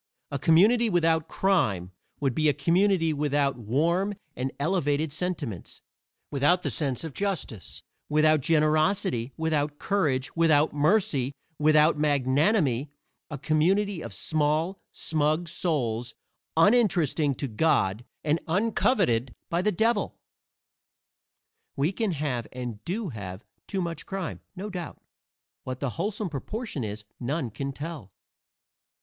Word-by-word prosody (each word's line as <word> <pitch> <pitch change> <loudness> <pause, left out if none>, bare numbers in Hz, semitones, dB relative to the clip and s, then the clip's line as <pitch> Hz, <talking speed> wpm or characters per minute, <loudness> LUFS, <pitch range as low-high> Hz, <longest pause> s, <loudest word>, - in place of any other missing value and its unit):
A 140 - -2
community 215 - +5
without 165 -3 +2
crime 110 - +1 0.3
would 135 -3 0
be 155 +3 +2
a 145 - +1
community 170 +2 +2
without 145 -2 +1
warm 170 - +1 0.2
and 130 +2 -2
elevated 145 -2 0
sentiments 155 - -4 0.5
without 145 +6 +3
the - - -1
sense 140 -5 -1
of 160 -4 -6
justice, 185 - -4 0.3
without 155 0 +4
generosity, 155 - +2
without 150 -2 0
courage, 145 -11 0
without 160 -2 +3
mercy, 150 - +2 0.3
without 155 +1 +4
magnanimity 145 - +2 0.4
a 150 - -5
community 185 +5 +1
of - - -7
small, 155 +4 0
smug 155 +2 0
souls, 120 -9 -1 0.4
uninteresting 170 - +3
to 140 - -3
God 110 -4 +1 0.2
and 155 +2 +1
uncoveted 180 - +1 0.2
by 170 +1 +1
the 210 +3 +2
Devil. 220 +2 0 1.6
We 145 +6 +1
can 205 -1 -1
have, 135 -7 -2
and 120 -4 -6
do 195 +3 -2
have, 100 -4 -7 0.2
too 190 -2 -2
much 165 -2 -5
crime, 190 -4 -4 0.2
no 200 +3 -5
doubt; 175 -4 -6 0.6
what 130 -1 -5
the 140 -4 -2
wholesome 200 - -2
proportion 185 - -4
is 105 0 -5
none 130 0 -2
can 140 +5 -4
tell. 145 - -7
155 Hz, 120 wpm, -27 LUFS, 135-180 Hz, 1.6 s, community